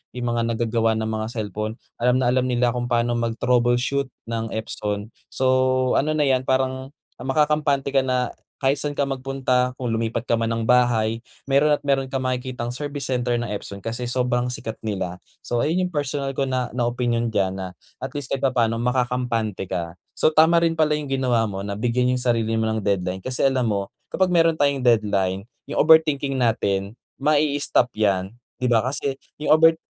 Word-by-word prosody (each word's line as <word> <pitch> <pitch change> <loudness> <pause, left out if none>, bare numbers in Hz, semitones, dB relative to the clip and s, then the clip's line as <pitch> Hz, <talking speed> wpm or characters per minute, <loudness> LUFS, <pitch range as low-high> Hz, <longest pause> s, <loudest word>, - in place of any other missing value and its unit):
yung 120 -1 -2
mga 115 -1 0
nagagawa 115 -1 +1
ng 110 0 -2
mga 110 0 -2
cellphone, 105 +1 -3 0.2
alam 125 +1 +3
na 120 - +2
alam 130 0 +2
nila 120 -1 +2
kung 120 0 -3
paano 120 0 +1
mag 115 -1 -1
troubleshoot 125 +3 +1 0.2
ng 115 -1 -2
Epson. 105 -1 -4 0.2
So, 130 0 +2
ano 155 +2 0
na 150 - +2
yan 130 -2 +1
parang 130 +1 -1 0.3
makakampante 145 0 +1
ka 135 - +4
na 125 -1 0 0.2
kahit 135 0 +1
saan 145 0 -1
ka 140 - +1
magpunta, 130 -2 -1
kung 125 -3 -3
lumipat 115 0 -1
ka 115 -2 0
man 115 - 0
ng 115 0 -1
bahay, 115 -2 +2 0.2
mayro'n 140 +2 +3
at - - -12
mayro'n 135 -1 +1
kang 130 0 -3
makikitang 125 -1 -3
service 145 +2 -4
center 125 -1 0
ng 120 - -1
Epson. 100 -1 -6
Kasi 115 +2 -3
sobrang 125 0 0
sikat 120 -3 -5
nila. 95 -4 -4 0.2
So 120 - -1
ayun 170 +8 +1
yung 180 - -5
personal 140 -1 -2
ko 135 0 -1
na, 130 -2 -1
na 120 -1 0
opinyon 120 -1 0
dyan 100 -4 0
na 90 -1 -6 0.2
at 130 +2 -6
least 145 -3 -4
kahit 135 - 0
papaano 115 -4 +1
makakampante 125 -5 -1
ka. 85 0 -4 0.2
So - - +3
tama 160 +2 +5
rin 165 -1 +2
pala 155 -2 +2
yung 145 -2 -5
ginawa 125 -4 +2
mo 100 -2 -4
na 100 - -3
bigyan 125 +3 +1
yung 125 - -2
sarili 115 -2 +1
mo 110 - +1
ng 110 - -1
deadline. 95 -2 -1
Kasi 130 +8 -1
alam 130 -3 +2
mo 100 -2 -2 0.2
kapag 185 -1 0
mayro'n 165 -2 +4
tayong 140 -2 +1
deadline, 100 -5 +2 0.2
yung 145 - +1
overthinking 150 -4 +4
natin, 100 -4 0 0.2
mai-stop 145 -3 +2
yan. 100 -2 0 0.2
Di 125 -1 -1
ba 115 - +5
kasi 135 0 -2 0.2
yung 150 - -1
over 160 0 +6
125 Hz, 190 wpm, -23 LUFS, 115-135 Hz, 0.3 s, over